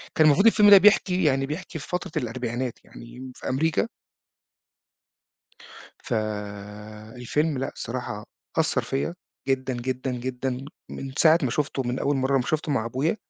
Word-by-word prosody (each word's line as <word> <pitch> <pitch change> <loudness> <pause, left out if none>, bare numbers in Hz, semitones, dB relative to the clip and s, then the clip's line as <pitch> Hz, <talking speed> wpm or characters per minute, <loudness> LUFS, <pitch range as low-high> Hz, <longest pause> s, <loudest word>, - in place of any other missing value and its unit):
كان 155 - +5
المفروض 155 +9 +5
الفيلم 210 -2 +6
ده 200 - +11
بيحكي، 190 -2 +4
يعني 135 -2 +2
بيحكي 160 +2 -5
في 145 - -9
فترة 180 -2 -3
الأربعينات 120 +1 -3
يعني 125 +2 -11
في - - -6
أمريكا. 155 +5 +1 2.2
ف - - -2 1.0
الفيلم 145 +4 0
لأ 135 - -2
الصراحة 115 -3 -5 0.3
أثر 145 -5 +2
فيا 135 +8 -2 0.3
جدًا، 130 -1 0
جدًا، 130 +2 -3
جدًا، 125 +1 -3 0.3
من 135 -1 -6
ساعة 160 0 +6
ما 130 - +1
شُفته 140 0 -1
من 125 +1 -2
أول 140 0 +1
مرة 135 +1 0
لمّا 135 -2 +3
شُفته 155 -1 -1
مع 115 -5 0
أبويا 135 - 0
135 Hz, 150 wpm, -25 LUFS, 125-155 Hz, 2.2 s, ده